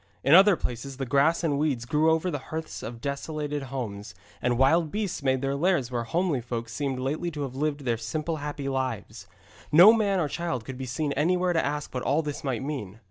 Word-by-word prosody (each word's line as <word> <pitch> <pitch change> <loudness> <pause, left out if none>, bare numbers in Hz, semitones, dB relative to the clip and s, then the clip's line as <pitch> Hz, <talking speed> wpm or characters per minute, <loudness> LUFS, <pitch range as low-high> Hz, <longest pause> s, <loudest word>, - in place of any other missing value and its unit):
In 140 - +4
other 195 +2 +8
places 130 -1 -5
the 135 - -3
grass 145 +7 +2
and 145 -4 +1
weeds 140 -6 0
grew 150 +5 +2
over 160 +3 +1
the 145 - -3
hearths 160 0 -5
of 115 0 -7
desolated 145 +1 -3
homes, 105 -8 -5 0.3
and 120 -1 +1
wild 155 +5 +4
beasts 205 -6 -2
made 130 -1 +1
their 135 0 0
lairs 145 -5 +1
where 120 -1 -2
homely 165 +1 0
folk 115 -1 -5
seemed 135 +3 -2
lately 145 +7 -2
to 150 -3 -4
have 135 -2 -5
lived 145 +1 -1
their 120 -4 0
simple 155 +8 -3
happy 145 -1 -5
lives. 130 -1 -3 0.4
No 180 +8 +9
man 205 -4 +1
or 160 - +1
child 145 -7 -3
could 130 -1 -7
be 130 - -4
seen 145 +3 -2
anywhere 180 +5 +1
to 165 - +2
ask 150 +1 -3
what 125 - -2
all 145 +6 +1
this 150 -1 -5
might 130 -3 -2
mean. 130 -9 -5
145 Hz, 215 wpm, -27 LUFS, 130-160 Hz, 0.4 s, No